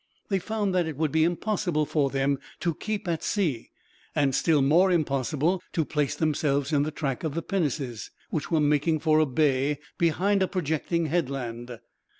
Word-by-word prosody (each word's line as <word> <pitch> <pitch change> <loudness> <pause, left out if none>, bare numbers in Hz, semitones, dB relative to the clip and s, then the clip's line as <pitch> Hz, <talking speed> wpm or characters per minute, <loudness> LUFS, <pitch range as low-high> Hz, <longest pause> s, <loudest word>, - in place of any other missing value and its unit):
They 195 -2 +1
found 210 -1 -2
that 180 -3 +2
it 155 -4 -5
would 155 -2 0
be 160 0 +3
impossible 175 -2 0
for 145 -2 +1
them 135 0 0 0.2
to 170 - +1
keep 210 +4 -4
at 165 -2 -1
sea, 160 - -1 0.5
and 140 -3 +2
still 150 0 +3
more 170 +7 +5
impossible 155 +2 +1
to 160 - +1
place 150 -2 -1
themselves 145 -2 0
in 145 - +4
the 150 - 0
track 140 -4 -3
of 155 -2 -2
the 165 - -2
pinnaces, 140 - -2 0.2
which 155 - -2
were 165 - +2
making 150 +2 +2
for 155 -1 +4
a 155 - +3
bay 140 +1 +1 0.2
behind 190 +5 +2
a 190 - +3
projecting 170 -1 -1
headland. 125 -7 -3
155 Hz, 175 wpm, -26 LUFS, 140-170 Hz, 0.5 s, more